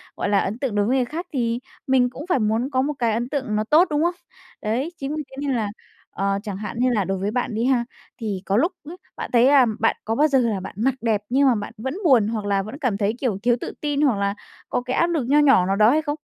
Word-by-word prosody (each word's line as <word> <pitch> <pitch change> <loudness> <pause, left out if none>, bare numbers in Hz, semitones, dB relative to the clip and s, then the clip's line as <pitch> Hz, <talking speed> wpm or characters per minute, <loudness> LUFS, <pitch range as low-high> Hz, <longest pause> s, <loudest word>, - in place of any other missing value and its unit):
gọi - - -2
là, 200 - +3
ấn 210 +4 -2
tượng 260 -7 -2
đối 205 0 +2
với 255 +4 +1
người 250 - +1
khác, 330 +7 -5
thì 235 -2 0 0.3
mình 255 -2 +3
cũng 275 +5 -9
phải 275 - +2
muốn 225 +4 0
có 260 0 +2
một 295 +2 -1
cái 230 -2 +1
ấn 240 +3 -2
tượng 260 -7 -2
nó 215 - +1
tốt, 310 +10 +4
đúng 300 +2 +1
không? 345 +1 +1 0.5
Đấy, 245 +10 -1
chính 285 +1 -4
vì 305 - -3
thế - - -11
nên 275 - +1
là, 215 -3 -1 0.4
ờ, 195 +1 -1
chẳng 200 -3 -5
hạn 210 +2 -6
như 255 0 +3
là 215 -5 +1
đối 190 +1 -2
với 200 +3 -2
bạn 240 -2 -2
đi 230 +2 0
ha, 250 -3 +2 0.4
thì 205 -4 -3
có 195 +2 +1
lúc 335 +9 +2 0.2
ấy, 350 - -8 0.2
bạn - - -5
thấy 240 +1 +5
là 275 -2 +6
bạn 225 - +2
có 225 +1 -1
bao 300 +4 +4
giờ 270 -3 +3
là 225 -5 0
bạn 185 - -8
mặc 255 +4 +1
đẹp 220 -3 +1
nhưng 275 +2 +3
mà 250 - +4
bạn 210 +1 -5
vẫn 265 +5 -4
buồn, 240 -8 +5
hoặc 215 -2 -3
là 200 -1 +1
vẫn 220 +8 -8
cảm 255 -9 -1
thấy, 205 +1 0
kiểu, 235 -8 -1
thiếu 240 -1 +3
tự - - -5
tin, 295 -1 -1
hoặc 255 -8 +3
là 200 0 0 0.3
có - - 0
cái 250 +1 -3
áp 340 - +3
lực 320 -6 0
nho 290 +2 +4
nhỏ 270 -11 +5
nào 195 - +1
đó 215 +2 +5
hay 310 +3 +2
không? 290 -1 -2
240 Hz, 290 wpm, -22 LUFS, 210-275 Hz, 0.5 s, là